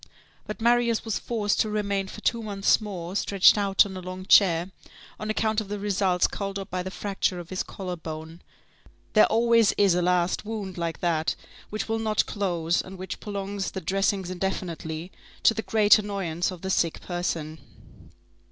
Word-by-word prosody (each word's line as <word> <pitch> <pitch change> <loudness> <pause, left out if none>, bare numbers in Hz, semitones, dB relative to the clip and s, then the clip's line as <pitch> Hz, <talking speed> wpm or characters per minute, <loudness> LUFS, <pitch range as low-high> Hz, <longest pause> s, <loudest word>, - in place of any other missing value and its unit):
But 215 - -5
Marius 235 0 +2
was 220 -3 -1
forced 210 -4 -1
to 215 - +2
remain 200 -2 -1
for 215 - -9
two 230 +1 +1
months 205 0 +2
more 185 -4 -6
stretched 200 -2 +5
out 200 -2 +3
on 195 -2 -7
a - - -5
long 185 +1 -7
chair, 180 -2 +5 0.5
on 215 - -4
account 220 0 +1
of 210 - -8
the 205 +1 -4
results 195 -3 +1
called 195 -1 -3
up 195 0 -7
by 180 0 -1
the 185 - -5
fracture 195 -1 -2
of 175 +1 -10
his 185 - -1
collar 185 -2 -5
bone. 160 0 -8 0.7
There 215 - +6
always 230 -1 +4
is 200 -3 +3
a 180 - +1
last 180 0 +1
wound 210 -4 -5
like 170 -2 -3
that 165 -2 +1 0.3
which 215 -1 -3
will 225 0 -1
not 215 -1 +1
close, 175 -5 0
and 190 0 -10
which 185 +1 -6
prolongs 200 -1 -4
the 190 - -5
dressings 195 +1 0
indefinitely, 175 -2 -4 0.3
to - - +6
the 220 - -3
great 215 -1 +5
annoyance 190 -5 -2
of 185 -2 -8
the 190 - -1
sick 165 -3 0
person. 165 -3 -3
195 Hz, 180 wpm, -26 LUFS, 180-210 Hz, 0.7 s, There